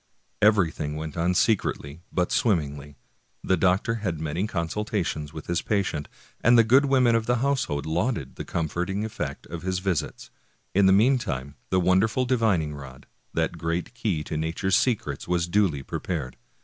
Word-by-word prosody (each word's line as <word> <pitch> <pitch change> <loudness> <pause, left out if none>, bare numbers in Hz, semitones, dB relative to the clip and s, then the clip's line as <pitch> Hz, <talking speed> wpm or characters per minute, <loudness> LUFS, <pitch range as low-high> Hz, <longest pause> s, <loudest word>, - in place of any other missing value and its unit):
Everything 85 -8 +2
went 80 0 -5
on 90 +2 +1
secretly 85 -8 0
but 90 -1 0
swimmingly. 75 - 0 0.5
The 95 - +2
doctor 95 +6 +2
had 90 -7 -2
many 80 +6 -2
consultations 85 -4 -2
with 80 -1 -8
his 85 -1 -1
patient, 95 -8 -1 0.4
and 120 +1 +6
the 115 - +7
good 130 +6 +5
women 130 -3 +4
of 115 -1 +1
the 125 - +3
household 120 - 0
lauded 80 - -1
the - - -5
comforting 90 +5 -2
effect 110 - -5
of 85 -1 -7
his 95 0 -1
visits. 90 -4 -3 0.4
In 100 0 +5
the - - +6
meantime 95 - +2 0.2
the 95 - +2
wonderful 95 +8 +2
divining 110 - +1
rod, 65 -3 -10 0.3
that - - -1
great 85 +6 -2
key 105 -10 -1
to 80 - -5
nature's 85 +4 0
secrets, 100 - 0
was 85 -1 +1
duly 85 -7 +1
prepared. 70 -8 -4
90 Hz, 160 wpm, -26 LUFS, 80-110 Hz, 0.5 s, the